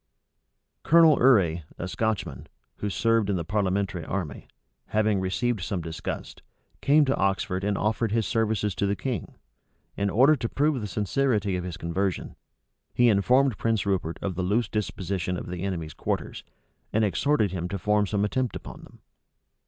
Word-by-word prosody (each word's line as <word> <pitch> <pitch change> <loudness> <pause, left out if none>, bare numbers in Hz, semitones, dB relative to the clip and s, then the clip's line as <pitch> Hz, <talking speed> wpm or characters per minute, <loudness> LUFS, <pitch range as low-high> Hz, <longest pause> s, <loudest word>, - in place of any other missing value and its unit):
Colonel 165 -2 +6
Urrey, 95 -10 +4 0.2
a 90 - -4
Scotchman, 95 - -2 0.3
who 105 - -3
served 115 0 +1
in 100 - +1
the 85 - -2
parliamentary 95 -2 -1
army, 85 -3 -4 0.4
having 110 -2 +1
received 105 +4 -1
some 95 +1 -2
disgust, 80 -1 -6 0.4
came 145 +1 +5
to 135 - +1
Oxford 95 -1 0
and 100 0 0
offered 110 +1 0
his 110 -1 +1
services 110 -3 0
to 100 - -1
the 100 - 0
king. 120 -5 -4 0.6
In 100 0 0
order 130 +10 +5
to 115 -4 -3
prove 145 -2 +1
the 105 - -3
sincerity 105 +1 0
of 90 - -3
his 90 -2 -5
conversion, 90 +3 -2 0.6
he 120 0 +5
informed 125 +4 +3
Prince 115 -2 0
Rupert 95 -4 -1
of 95 - -1
the 90 - -3
loose 105 +5 +1
disposition 95 -3 -2
of - - -6
the 90 0 -6
enemy's 85 -5 -3
quarters, - - -3 0.5
and 110 0 +2
exhorted 110 0 +1
him 90 -1 -3
to 100 - -3
form 105 +2 +1
some 100 +1 0
attempt 125 +3 -1
upon - - -8
them. - - -16
100 Hz, 165 wpm, -26 LUFS, 95-115 Hz, 0.6 s, Colonel